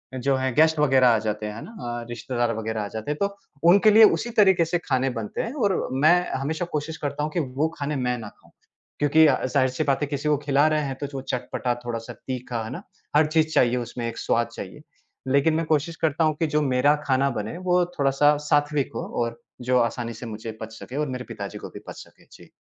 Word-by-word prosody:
जो 135 Hz, +1 st, +1 dB
है 130 Hz, 0 st, -1 dB
गेस्ट 160 Hz, 0 st, +4 dB
वग़ैरह 135 Hz, -3 st, +5 dB
आ, 115 Hz, -2 st, +5 dB
जाते 105 Hz, 0 st, -3 dB
हैं, 105 Hz, -, -4 dB
हैं 115 Hz, -, -7 dB
ना? -, -, -10 dB, 0.3 s
अ, -, -, -9 dB
रिश्तेदार 120 Hz, 0 st, -2 dB
वग़ैरह 110 Hz, 0 st, -3 dB
आ 100 Hz, -, -4 dB
जाते 110 Hz, +7 st, -5 dB
हैं 150 Hz, -, -3 dB
तो 200 Hz, 0 st, 0 dB, 0.3 s
उनके 200 Hz, +4 st, +6 dB
लिए 220 Hz, +2 st, +8 dB
उसी 240 Hz, -, -4 dB
तरीके 190 Hz, -4 st, +5 dB
से 175 Hz, +2 st, 0 dB
खाने 130 Hz, -1 st, +1 dB
बनते 105 Hz, -2 st, -4 dB
हैं 230 Hz, -, -4 dB
और 205 Hz, -10 st, 0 dB, 0.2 s
मैं 165 Hz, +3 st, +7 dB, 0.2 s
हमेशा 155 Hz, +6 st, -2 dB
कोशिश 155 Hz, +2 st, -5 dB
करता 145 Hz, 0 st, -3 dB
हूँ 155 Hz, -, -2 dB
कि 170 Hz, -, -1 dB, 0.2 s
वो 155 Hz, -, +3 dB
खाने 145 Hz, +1 st, -2 dB
मैं 125 Hz, -2 st, -1 dB
ना 110 Hz, -3 st, -7 dB
खाऊँ। -, -, -25 dB, 0.5 s
क्योंकि 150 Hz, +2 st, +5 dB
ज़ाहिर-सी 130 Hz, 0 st, +1 dB
बात 140 Hz, -2 st, 0 dB
है 145 Hz, -, 0 dB
किसी 145 Hz, +1 st, -2 dB
को 150 Hz, -, +3 dB
खिला 145 Hz, +1 st, +3 dB
रहे 155 Hz, -, +2 dB
हैं 135 Hz, -, -4 dB
तो 145 Hz, -, -2 dB
जो 135 Hz, -1 st, -6 dB
चटपटा 125 Hz, -1 st, -2 dB
थोड़ा-सा, 115 Hz, 0 st, -5 dB
तीखा, 125 Hz, -1 st, -5 dB
है 110 Hz, -, -6 dB
ना? -, -, -6 dB, 0.3 s
हर 155 Hz, +1 st, +6 dB
चीज़ 155 Hz, 0 st, +2 dB
चाहिए 125 Hz, 0 st, +3 dB
उसमें, 120 Hz, 0 st, -4 dB
एक 115 Hz, -, -6 dB
स्वाद 115 Hz, 0 st, 0 dB
चाहिए, -, -, -8 dB, 0.5 s
लेकिन 140 Hz, +4 st, +3 dB
मैं 165 Hz, +1 st, 0 dB
कोशिश 155 Hz, +2 st, 0 dB
करता 160 Hz, +1 st, +1 dB
हूँ 155 Hz, -1 st, +2 dB
कि 165 Hz, -, +1 dB
जो 150 Hz, -, +4 dB
मेरा 135 Hz, +1 st, +3 dB
खाना 135 Hz, +1 st, +2 dB
बने 105 Hz, +10 st, -5 dB
वो 180 Hz, 0 st, +4 dB, 0.2 s
थोड़ा-सा 140 Hz, +2 st, +4 dB
सात्विक 145 Hz, -1 st, +1 dB
हो -, -, -3 dB, 0.2 s
और 115 Hz, 0 st, -5 dB, 0.3 s
जो 125 Hz, 0 st, +4 dB
आसानी 115 Hz, 0 st, -1 dB
से 115 Hz, +2 st, -9 dB
मुझे 110 Hz, 0 st, -6 dB
पच 110 Hz, 0 st, -7 dB
सके 130 Hz, -, -9 dB
और 150 Hz, -, 0 dB
मेरे 125 Hz, -1 st, -4 dB
पिता 100 Hz, -2 st, -5 dB
जी -, -, -9 dB
को -, -, -8 dB
भी -, -, -10 dB
बच -, -, -7 dB
सके। -, -, -23 dB
जी। -, -, -16 dB
135 Hz, 235 wpm, -24 LUFS, 120-155 Hz, 0.5 s, लिए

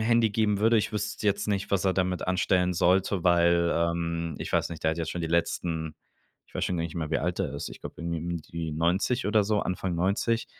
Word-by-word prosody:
Handy 115 Hz, 0 st, +3 dB
geben 105 Hz, -1 st, +1 dB
würde, 115 Hz, +1 st, +4 dB
ich 105 Hz, -, -1 dB
wüsste 105 Hz, 0 st, -3 dB
jetzt 100 Hz, +1 st, +1 dB
nicht, 100 Hz, -2 st, -1 dB
was 100 Hz, 0 st, +2 dB
er 95 Hz, -, +2 dB
damit 90 Hz, -1 st, 0 dB
anstellen 90 Hz, 0 st, +2 dB
sollte, 95 Hz, +1 st, +2 dB
weil, 85 Hz, -1 st, +4 dB
ähm, 85 Hz, -1 st, -1 dB
ich -, -, -5 dB
weiß -, -, +2 dB
nicht, 80 Hz, -1 st, -8 dB
der 80 Hz, -, +3 dB
hat 85 Hz, -, -6 dB
jetzt 80 Hz, -, -2 dB
schon 90 Hz, -, -4 dB
die 80 Hz, -, -1 dB
letzten 80 Hz, -1 st, -1 dB, 0.5 s
ich -, -, -26 dB
weiß -, -, -1 dB
schon 90 Hz, -, -1 dB
gar 85 Hz, -, -1 dB
nicht 80 Hz, -, -6 dB
mehr, 80 Hz, -2 st, -3 dB
wie -, -, +1 dB
alt 85 Hz, +4 st, -2 dB
er -, -, -2 dB
ist, 70 Hz, -, -4 dB
ich -, -, -11 dB
glaube -, -, -8 dB
irgendwie 85 Hz, -1 st, -3 dB
um 85 Hz, +1 st, -3 dB
die 80 Hz, 0 st, -5 dB
90 90 Hz, -, +1 dB
oder 105 Hz, 0 st, +4 dB
so, 105 Hz, +1 st, +1 dB
Anfang 90 Hz, -1 st, -2 dB
90, 100 Hz, +6 st, +1 dB
90 Hz, 245 wpm, -27 LUFS, 85-100 Hz, 0.5 s, würde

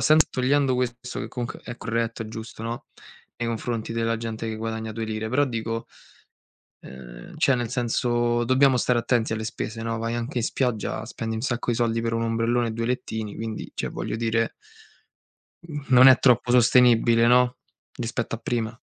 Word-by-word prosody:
sempre 155 Hz, 0 st, +5 dB
togliendo 130 Hz, 0 st, +2 dB
questo 125 Hz, 0 st, -3 dB
che -, -, -4 dB
comunque 120 Hz, 0 st, -5 dB
è 120 Hz, -, -7 dB
corretto, 115 Hz, 0 st, -2 dB
è 110 Hz, -, -7 dB
giusto, 110 Hz, 0 st, -8 dB
no, 115 Hz, +1 st, -4 dB, 0.5 s
nei 120 Hz, 0 st, -2 dB
confronti 115 Hz, 0 st, -3 dB
della 115 Hz, 0 st, 0 dB
gente 115 Hz, 0 st, -4 dB
che 110 Hz, -, -4 dB
guadagna 110 Hz, 0 st, -4 dB
due 115 Hz, 0 st, -4 dB
lire, 110 Hz, 0 st, -3 dB
però 140 Hz, +5 st, +3 dB
dico 115 Hz, -3 st, -3 dB, 0.9 s
...ehm, -, -, -11 dB
cioè 135 Hz, -, +4 dB
nel 120 Hz, -2 st, -3 dB
senso 120 Hz, -1 st, +1 dB
dobbiamo 130 Hz, +1 st, +4 dB
stare 125 Hz, 0 st, +2 dB
attenti 115 Hz, -1 st, +1 dB
alle 110 Hz, 0 st, -2 dB
spese, 115 Hz, 0 st, -5 dB
no. 115 Hz, 0 st, -2 dB
Vai 115 Hz, +1 st, -2 dB
anche 120 Hz, +2 st, -3 dB
in 115 Hz, -, 0 dB
spiaggia, 125 Hz, -4 st, -1 dB
spendi 110 Hz, 0 st, -4 dB
un 110 Hz, -, -3 dB
sacco 120 Hz, -2 st, -1 dB
di 115 Hz, -, 0 dB
soldi 115 Hz, -1 st, +1 dB
per 115 Hz, 0 st, -1 dB
1 115 Hz, 0 st, 0 dB
ombrellone 115 Hz, +1 st, +1 dB
e -, -, -3 dB
2 115 Hz, +1 st, -2 dB
lettini, 110 Hz, -4 st, -3 dB
quindi 110 Hz, -1 st, -5 dB
cioè, -, -, -3 dB
voglio -, -, -4 dB
dire 115 Hz, 0 st, 0 dB, 1.4 s
non 130 Hz, 0 st, +8 dB
è 130 Hz, -1 st, +9 dB
troppo 125 Hz, -1 st, +4 dB
sostenibile, 120 Hz, -1 st, +5 dB
no, 125 Hz, +1 st, +4 dB, 0.4 s
rispetto 115 Hz, 0 st, -3 dB
a -, -, -15 dB
prima. 115 Hz, -1 st, -3 dB
115 Hz, 180 wpm, -25 LUFS, 115-125 Hz, 1.4 s, è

